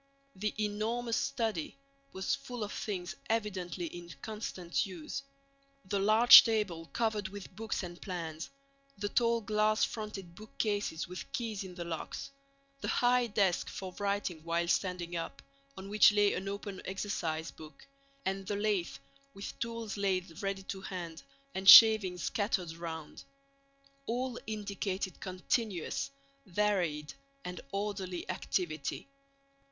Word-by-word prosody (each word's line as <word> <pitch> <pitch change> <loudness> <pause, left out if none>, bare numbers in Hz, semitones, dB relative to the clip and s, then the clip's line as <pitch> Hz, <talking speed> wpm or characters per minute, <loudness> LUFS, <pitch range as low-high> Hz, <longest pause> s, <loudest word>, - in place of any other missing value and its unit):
The 210 +2 -1
enormous 220 +3 -1
study 225 - -1 0.3
was 190 0 -1
full 245 -4 -4
of 210 - -4
things 185 -4 -4
evidently 190 -5 -1
in 175 +1 -8
constant 200 -5 -2
use. 180 - -5 0.6
The 195 +1 -1
large 215 +4 +10
table 205 -8 -1
covered 215 -2 -1
with 195 -1 -9
books 220 -1 -3
and 175 -1 -8
plans, 165 -4 -5 0.5
the 205 +1 -2
tall 235 +1 +2
glass 215 +1 +2
fronted 210 -5 -6
bookcases 205 -4 -2
with 180 +1 -8
keys 220 -5 -2
in 185 -2 -9
the 175 -1 -5
locks, 170 - -5 0.5
the - - -4
high 245 0 +3
desk 200 -5 +1
for 185 -1 -6
writing 200 -5 -1
while 170 +1 0
standing 175 -1 0
up, 170 +10 -4 0.4
on 190 +1 -7
which 210 +1 +7
lay 205 -1 +4
an 190 +2 -3
open 200 -1 -5
exercise 170 -5 -2
book, 155 -3 -13 0.4
and 195 0 -2
the 205 - -1
lathe 200 -7 0 0.4
with 195 - -7
tools 230 -2 -4
laid 185 -4 -1
ready 195 -1 -2
to 190 0 -6
hand 175 -4 -6 0.3
and 190 0 +3
shavings 210 -6 +10
scattered 190 -5 0
around—all 275 - -7
indicated 200 -3 -3
continuous, 185 - -1 0.4
varied, 175 -6 0 0.3
and 180 0 -5
orderly 195 -3 -3
activity. 175 - -2
195 Hz, 125 wpm, -32 LUFS, 180-215 Hz, 0.6 s, large